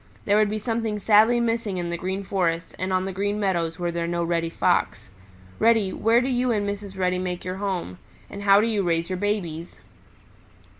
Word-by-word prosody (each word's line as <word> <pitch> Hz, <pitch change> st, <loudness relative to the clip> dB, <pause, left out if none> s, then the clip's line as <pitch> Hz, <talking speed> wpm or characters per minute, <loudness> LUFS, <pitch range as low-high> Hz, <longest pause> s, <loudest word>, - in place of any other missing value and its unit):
There 205 Hz, -, +3 dB
would 215 Hz, -1 st, +3 dB
be 215 Hz, -, -2 dB
something 225 Hz, -1 st, -2 dB
sadly 220 Hz, +3 st, +4 dB
missing 230 Hz, -4 st, -1 dB
in 175 Hz, -1 st, -3 dB
the -, -, -1 dB
Green 190 Hz, +3 st, -3 dB
Forest 170 Hz, -4 st, -1 dB
and 185 Hz, +1 st, -2 dB
on 185 Hz, 0 st, +1 dB
the 195 Hz, -, -3 dB
Green 205 Hz, +2 st, -2 dB
Meadows 170 Hz, -5 st, -1 dB
were 175 Hz, -1 st, -2 dB
there 170 Hz, 0 st, -2 dB
no 170 Hz, 0 st, -1 dB
Reddy 165 Hz, -1 st, -1 dB
Fox. 165 Hz, -, 0 dB, 0.5 s
Reddy, 220 Hz, -4 st, +3 dB
where 230 Hz, +2 st, +3 dB
do 255 Hz, -, -1 dB
you 250 Hz, -1 st, +1 dB
and 205 Hz, -3 st, 0 dB
Mrs. 200 Hz, -1 st, -5 dB
Reddy 180 Hz, -1 st, 0 dB
make 180 Hz, -1 st, -4 dB
your 185 Hz, +1 st, -4 dB
home? 185 Hz, -, -3 dB, 0.3 s
And 200 Hz, -, -8 dB
how 200 Hz, 0 st, +5 dB
do -, -, +1 dB
you 220 Hz, -3 st, 0 dB
raise 170 Hz, -1 st, -1 dB
your 185 Hz, -, -1 dB
babies?" 180 Hz, -5 st, -3 dB
195 Hz, 205 wpm, -24 LUFS, 175-210 Hz, 0.5 s, how